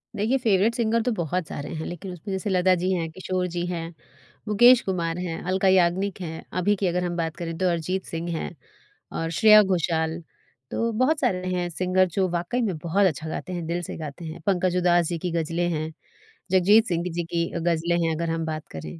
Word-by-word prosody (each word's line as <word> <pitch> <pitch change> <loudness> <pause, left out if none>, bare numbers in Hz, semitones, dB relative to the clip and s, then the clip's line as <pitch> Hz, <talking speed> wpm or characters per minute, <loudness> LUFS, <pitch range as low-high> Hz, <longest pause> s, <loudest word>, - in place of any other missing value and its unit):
देखिए, 220 +6 +1
favourite 225 -1 +2
singer 230 -1 +1
तो 245 +1 0
बहुत 175 -3 -2
सारे 145 - -6
हैं, 155 - -4
लेकिन 175 +2 -6
उसमें 185 +4 -8
जैसे 190 +2 -2
लता 185 0 +3
जी 185 +1 +1
हैं, 165 -2 -1
किशोर 185 +1 -2
जी 175 0 -1
हैं, 170 -1 -4 0.5
मुकेश 240 +4 +6
कुमार 170 -3 -2
हैं, 175 -2 -4
अलका 190 +1 +1
याग्निक 190 +1 +2
हैं। 160 -2 -6 0.2
अभी 205 +3 +2
की 190 -1 -1
अगर 180 +1 0
हम 175 -1 -2
बात 165 -1 -2
करें 165 -2 -5
तो 185 - +1
अरिजीत 180 +3 -2
सिंह 165 +1 -5
है, - - -4 0.6
और 165 0 -3
श्रेया 215 -1 +8
घोषाल, 165 -3 0 0.5
तो 230 0 0
बहुत 305 +4 +3
सारे 185 -9 0
हैं 175 -1 -1
सिंगर 185 +2 +2
जो 190 -1 +3
वाक़ई 175 +8 -1
में 190 -8 -1
बहुत 175 +6 +1
अच्छा 160 -1 -3
गाते 185 - -5
हैं, 170 -2 -4
दिल 175 +1 -1
से - - -6
गाते 155 +1 -7
हैं। 160 0 -7
पंकज 180 -1 +2
उदास 175 -2 +3
जी 170 - -2
की 180 0 -3
गज़लें 170 +1 -1
हैं, 155 -1 -2 0.6
जगजीत 205 +5 +5
सिंह 170 -1 -1
जी 170 0 -1
की 170 0 -1
अ, 170 - -3
गज़लें 170 0 +1
हैं 160 - 0
अगर 165 +1 -2
हम 165 0 -1
बात 155 -1 -5
करें। 80 +1 -7
175 Hz, 215 wpm, -25 LUFS, 165-190 Hz, 0.6 s, श्रेया